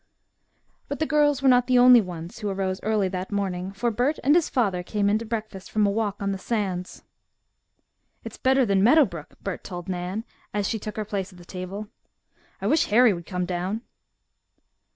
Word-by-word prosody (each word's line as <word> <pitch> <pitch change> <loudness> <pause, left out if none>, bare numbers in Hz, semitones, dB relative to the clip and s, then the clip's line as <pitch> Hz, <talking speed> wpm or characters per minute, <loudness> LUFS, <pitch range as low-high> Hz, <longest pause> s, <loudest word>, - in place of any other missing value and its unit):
But 285 - -4
the 315 - 0
girls 290 -2 +2
were - - +4
not 245 -1 +5
the 255 -1 +4
only 245 -1 +8
ones 175 0 -8
who 210 -2 -2
arose 190 -1 -2
early 215 -2 +1
that 185 +1 -5
morning, 190 -2 -2
for 235 +4 -1
Bert 250 +7 0
and 285 - +5
his 340 -1 +3
father 200 -8 +1
came 200 +2 0
in 215 - +2
to 230 - -6
breakfast 215 -4 -5
from 215 -1 +2
a 200 - +2
walk 205 -1 -1
on 200 - 0
the 195 - -4
sands. 190 -5 -3 1.2
"It's - - -8
better 265 -1 +3
than 195 -2 +2
Meadow 290 +6 +6
Brook," 170 -8 -9
Bert 195 -3 -4
told 175 -1 -7
Nan, 185 +3 -3 0.3
as 205 -1 0
she 225 - -2
took 210 +1 -7
her 215 - -2
place 200 -2 -3
at 180 - -16
the 175 - -14
table. 190 +4 -6 0.7
"I - - -6
wish 315 - +3
Harry 230 +1 +5
would 170 -2 -8
come 180 -2 -2
down." 185 +5 -3
205 Hz, 200 wpm, -25 LUFS, 185-235 Hz, 1.2 s, only